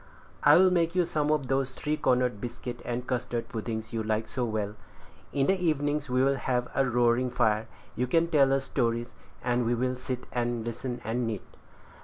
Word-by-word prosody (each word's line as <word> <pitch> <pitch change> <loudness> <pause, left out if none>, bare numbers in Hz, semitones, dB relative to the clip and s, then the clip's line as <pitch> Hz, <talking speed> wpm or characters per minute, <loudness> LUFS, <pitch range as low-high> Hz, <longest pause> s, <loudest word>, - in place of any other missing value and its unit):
I'll 185 +1 +7
make 170 -1 +1
you 180 -1 +3
some 150 -3 0
of 150 -4 +1
those 135 0 0
three 150 +1 -1
cornered 125 -6 +1
biscuit 120 0 -6
and 120 +1 -3
custard 120 -2 -2
puddings 110 -1 -4
you 115 - -1
like 110 0 -1
so 125 - -3
well. 105 -2 -2 0.6
In 140 -1 +1
the 190 +3 +1
evenings 150 -2 0
we'll 130 +2 +3
have 125 -1 0
a 135 - +3
roaring 120 +1 +3
fire; 110 -2 +1 0.3
you 125 - 0
can 165 +5 +3
tell 135 -4 +4
stories, 120 -3 -1 0.3
and 120 0 +1
we 120 +1 +1
will 125 +2 0
sit 125 0 -5
and 120 -2 -1
listen, 120 +1 -4
and 115 +2 -1
knit. 110 -4 -3
125 Hz, 180 wpm, -28 LUFS, 120-135 Hz, 0.6 s, I'll